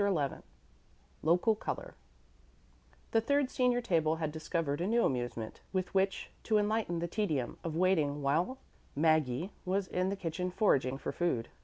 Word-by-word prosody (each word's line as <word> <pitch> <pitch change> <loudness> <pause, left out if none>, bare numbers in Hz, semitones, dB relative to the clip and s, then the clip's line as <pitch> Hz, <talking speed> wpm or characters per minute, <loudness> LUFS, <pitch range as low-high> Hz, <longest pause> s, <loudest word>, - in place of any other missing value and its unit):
XI 175 -9 +2 0.9
"Local 175 +7 +4
Color" 210 - -5 1.2
The 225 - +4
third 280 +2 +1
senior 250 -1 +2
table 160 -7 +2
had 160 -2 -2
discovered 155 -1 -2
a 180 - 0
new 235 +2 +3
amusement 120 -3 -3
with 185 -2 -2
which 195 0 0
to 220 - +2
enlighten 210 -4 +1
the 170 +1 -1
tedium 160 - -1
of 165 -2 -3
waiting 155 -5 +2
while 165 - +1 0.4
Maggie 155 +2 +2
was 190 +2 0
in 185 +1 0
the 200 - -1
kitchen 180 -1 -3
foraging 135 - +2
for - - -4
food. 165 -10 -1
175 Hz, 150 wpm, -32 LUFS, 150-200 Hz, 1.2 s, Local